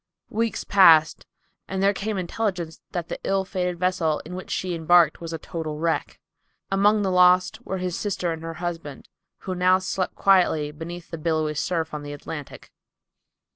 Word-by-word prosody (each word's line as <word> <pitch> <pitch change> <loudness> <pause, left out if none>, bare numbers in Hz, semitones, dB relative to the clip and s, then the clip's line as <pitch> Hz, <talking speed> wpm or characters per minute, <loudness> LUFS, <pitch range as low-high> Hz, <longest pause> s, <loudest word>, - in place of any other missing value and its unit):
Weeks 225 +1 -1
passed, 165 -6 +5 0.4
and 190 0 -2
there 200 +1 +4
came 205 +1 -3
intelligence 180 -3 -3
that 175 -2 -4
the - - -5
ill 195 0 0
fated 180 -2 -2
vessel 175 -4 0
in 170 - -8
which 185 +1 -7
she 185 -1 -2
embarked 165 -1 +4
was 165 -1 -6
a 165 - -3
total 160 -2 -5
wreck. 165 +1 -2 0.5
Among 205 +2 +3
the 190 - 0
lost 180 +5 +4
were 190 - -2
his 180 -2 -3
sister 185 -4 -2
and 160 -1 -5
her 165 0 -6
husband, 165 -5 -6 0.3
who 185 - -4
now 185 +1 +4
slept 185 0 -3
quietly 175 -6 +3
beneath 170 +3 -8
the 165 - -5
billowy 155 -1 0
surf 160 +1 -2
of 150 - -4
the 145 0 -7
Atlantic. 145 0 -8
175 Hz, 175 wpm, -24 LUFS, 160-190 Hz, 0.5 s, passed